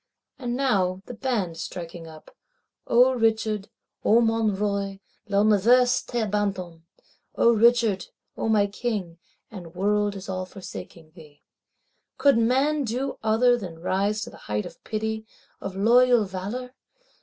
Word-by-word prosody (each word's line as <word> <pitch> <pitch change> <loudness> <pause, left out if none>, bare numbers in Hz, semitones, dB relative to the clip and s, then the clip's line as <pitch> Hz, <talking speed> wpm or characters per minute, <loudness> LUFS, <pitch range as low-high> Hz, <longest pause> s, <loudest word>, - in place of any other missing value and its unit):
And 245 -2 -3
now, 195 -8 0
the - - -8
band 215 -9 -2
striking 170 -1 -7
up, 155 -1 -14 0.5
O 250 +2 +5
Richard, 220 -3 0 0.3
O 225 - +5
mon 225 -3 +1
Roi, 200 -1 -2 0.3
l'univers 220 +5 +4
t'abandonne 200 -7 -2 0.5
(O 235 - +5
Richard, 230 -4 +3 0.3
O - - -2
my 210 -2 +4
King, 200 -5 -4 0.3
and 175 -5 -10
world 205 +2 +1
is 195 -1 -8
all 185 -1 -4
forsaking 170 -4 -10
thee)—could 165 - -4
man 270 +6 +2
do 260 +3 -3
other 225 +3 +3
than 175 -6 -8
rise 200 +4 0
to - - -7
height 105 0 -4
of - - -12
pity, 220 0 -3 0.3
of 195 -1 -6
loyal 240 +2 +4
valour? 205 +7 -6
210 Hz, 125 wpm, -25 LUFS, 190-235 Hz, 0.5 s, O